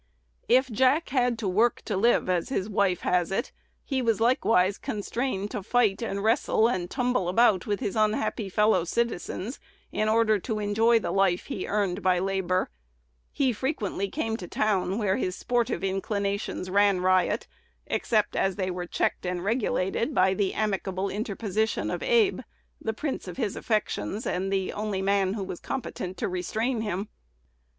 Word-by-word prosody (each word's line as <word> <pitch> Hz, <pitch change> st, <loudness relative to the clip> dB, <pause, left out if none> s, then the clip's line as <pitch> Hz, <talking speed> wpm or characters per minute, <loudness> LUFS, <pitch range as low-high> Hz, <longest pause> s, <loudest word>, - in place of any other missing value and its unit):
If 260 Hz, +1 st, +4 dB
Jack 260 Hz, +8 st, +3 dB
had 250 Hz, -3 st, +1 dB
"to 220 Hz, -3 st, -3 dB
work 220 Hz, +6 st, +2 dB
to 210 Hz, -, -2 dB
live," 230 Hz, +3 st, +3 dB
as 180 Hz, +4 st, 0 dB
his 200 Hz, -7 st, -1 dB
wife 200 Hz, -4 st, +1 dB
has 180 Hz, 0 st, +1 dB
it, 235 Hz, +7 st, -1 dB, 0.3 s
he 265 Hz, -2 st, -1 dB
was 225 Hz, -3 st, +1 dB
likewise 225 Hz, -5 st, +3 dB
constrained 210 Hz, -1 st, -3 dB
to 210 Hz, -, -3 dB
fight 220 Hz, 0 st, +2 dB
and 200 Hz, -3 st, -3 dB
wrestle 225 Hz, 0 st, +3 dB
and 180 Hz, -6 st, -2 dB
tumble 245 Hz, -7 st, 0 dB
about 215 Hz, +1 st, +3 dB
with 205 Hz, -2 st, -1 dB
his 200 Hz, -, -2 dB
unhappy 215 Hz, -1 st, 0 dB
fellow 210 Hz, -2 st, +3 dB
citizens, 235 Hz, +3 st, -2 dB, 0.3 s
in 215 Hz, -, 0 dB
order 220 Hz, -1 st, +3 dB
to 220 Hz, +2 st, -3 dB
enjoy 220 Hz, +3 st, +3 dB
the 225 Hz, -, -2 dB
life 195 Hz, -2 st, +2 dB
he 220 Hz, -10 st, -4 dB
earned 200 Hz, -2 st, 0 dB
by 185 Hz, -1 st, +3 dB
labor. 185 Hz, -1 st, 0 dB, 0.6 s
He 265 Hz, -3 st, +1 dB
frequently 205 Hz, -, -2 dB
came 225 Hz, -5 st, -2 dB
"to 180 Hz, -, -8 dB
town," 195 Hz, -2 st, 0 dB
where 200 Hz, -4 st, +1 dB
his 185 Hz, -, -2 dB
sportive 240 Hz, -3 st, -1 dB
inclinations 200 Hz, -1 st, -2 dB
ran 200 Hz, -1 st, +4 dB
riot, 185 Hz, -1 st, +2 dB, 0.4 s
except 215 Hz, -3 st, 0 dB
as 195 Hz, -1 st, +1 dB
they 185 Hz, -1 st, -2 dB
were 180 Hz, 0 st, -4 dB
checked -, -, -1 dB
and 180 Hz, -1 st, -2 dB
regulated 225 Hz, +2 st, 0 dB
by 190 Hz, +1 st, +4 dB
the 195 Hz, 0 st, -1 dB
amicable 195 Hz, -2 st, -1 dB
interposition 215 Hz, 0 st, -1 dB
of -, -, -3 dB
Abe, 470 Hz, -5 st, +3 dB, 0.4 s
the 220 Hz, -, -2 dB
prince 280 Hz, +4 st, -4 dB
of -, -, -7 dB
his 225 Hz, -7 st, -1 dB
affections, 215 Hz, 0 st, -2 dB
and 190 Hz, +2 st, -1 dB
the 190 Hz, -1 st, -1 dB
only 205 Hz, -2 st, -2 dB
man 195 Hz, -1 st, +2 dB
who 205 Hz, -, -3 dB
was 180 Hz, -, -6 dB
competent 190 Hz, -8 st, -5 dB
to -, -, -1 dB
restrain 220 Hz, +7 st, -1 dB
him. 205 Hz, -1 st, -3 dB
205 Hz, 165 wpm, -27 LUFS, 190-230 Hz, 0.6 s, If